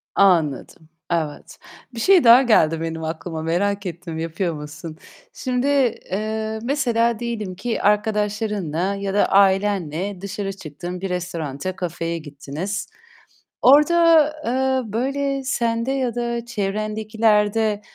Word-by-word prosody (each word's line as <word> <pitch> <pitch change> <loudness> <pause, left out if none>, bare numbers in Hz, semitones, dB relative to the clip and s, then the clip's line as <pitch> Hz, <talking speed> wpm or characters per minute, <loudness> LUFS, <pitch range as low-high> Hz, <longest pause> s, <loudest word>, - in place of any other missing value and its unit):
Anladım. 160 -4 +1 0.2
Evet. 160 -3 -3 0.4
Bir - - -5
şey 375 +5 +5
daha 235 +2 +8
geldi 165 -10 +3
benim 165 0 -4
aklıma. 160 0 -5
Merak 195 +5 -1
ettim, 170 -1 -6
yapıyor 165 +2 -2
musun? 150 +2 -8 0.4
Şimdi, 255 +1 -1 0.4
eee, 220 +2 -2
mesela 235 -4 +1
diyelim 220 -6 -4
ki, 230 +5 -3
arkadaşlarınla 205 -4 0
ya 195 -1 -3
da 205 - +3
ailenle 195 -2 +1
dışarı 200 0 -4
çıktın, 175 +1 -8
bir 195 - -3
restoranta, 175 -2 -4
kafeye 170 -2 -3
gittiniz. 160 +7 -5 0.7
Orada, 325 +3 +6 0.2
eee, 260 -2 0
böyle 275 +3 -1
sende 235 -1 -1
ya 260 -4 -1
da 235 -1 -2
çevrendekilerde, 215 0 0
205 Hz, 115 wpm, -22 LUFS, 170-235 Hz, 0.7 s, daha